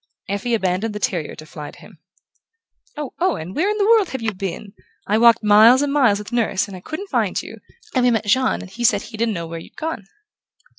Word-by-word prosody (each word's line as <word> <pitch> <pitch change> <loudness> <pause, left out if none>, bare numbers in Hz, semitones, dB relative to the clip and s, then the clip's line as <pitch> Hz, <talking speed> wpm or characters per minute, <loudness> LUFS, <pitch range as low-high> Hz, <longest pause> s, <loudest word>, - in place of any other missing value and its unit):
Effie 205 +4 -1
abandoned 200 +2 -1
the - - -3
terrier 185 -11 -2
to 155 - -11
fly 150 -1 -9
to - - -15
him. - - -16 1.0
"Oh, 295 -3 -5
Owen, 255 - -1
where 360 - +1
in 425 - -1
the 405 - +2
world 440 -4 +4
have 265 - -5
you 220 -1 -1
been? 195 +1 -6 0.3
I 215 +2 +1
walked 235 -1 +5
miles 220 +6 +6
and 285 -1 -1
miles 250 -8 +4
with 210 0 -9
Nurse 220 -5 0
and 185 -2 -10
couldn't 385 +6 -7
find - - 0
you, - - -9 0.4
and 255 - +2
we 250 - +5
met 225 -2 0
Jean 260 +5 +1
and 185 - -11
he 240 +5 -6
said 235 - +3
he 230 - -10
didn't 225 -1 0
know 170 -1 -4
where 165 0 -7
you'd - - -15
gone." 315 -11 -4
225 Hz, 230 wpm, -21 LUFS, 195-260 Hz, 1.0 s, miles